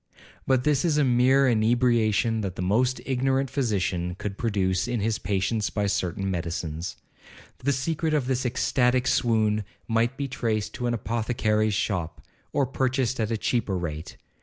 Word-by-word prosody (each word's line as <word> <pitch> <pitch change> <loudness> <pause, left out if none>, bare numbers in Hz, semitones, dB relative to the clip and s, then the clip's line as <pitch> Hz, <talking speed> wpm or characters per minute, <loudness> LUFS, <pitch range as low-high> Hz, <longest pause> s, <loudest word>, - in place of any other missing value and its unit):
But 130 -2 +3
this 145 -2 +2
is 160 -4 +2
a 150 - +4
mere 130 +2 +4
inebriation 115 -1 +2
that 95 -3 -4
the 90 - -3
most 125 +7 +1
ignorant 135 0 0
physician 95 -9 -1
could 100 -1 -4
produce 95 -4 0
in 120 -1 -1
his 110 +1 0
patients 100 +2 0
by 105 -1 -1
certain 95 0 -1
medicines. 85 0 -4 0.6
The 140 - +1
secret 155 +4 -1
of 145 -4 +1
this 130 0 0
ecstatic 125 0 +1
swoon 110 -4 +2 0.2
might 115 +3 +1
be 140 - -2
traced 110 -5 -2
to 125 - -3
an 120 - 0
apothecary's 110 -2 0
shop, 90 -6 -2 0.3
or 140 - +2
purchased 130 -1 0
at 110 -1 0
a 115 - 0
cheaper 105 -4 0
rate. 80 -1 -5
115 Hz, 160 wpm, -26 LUFS, 100-130 Hz, 0.6 s, a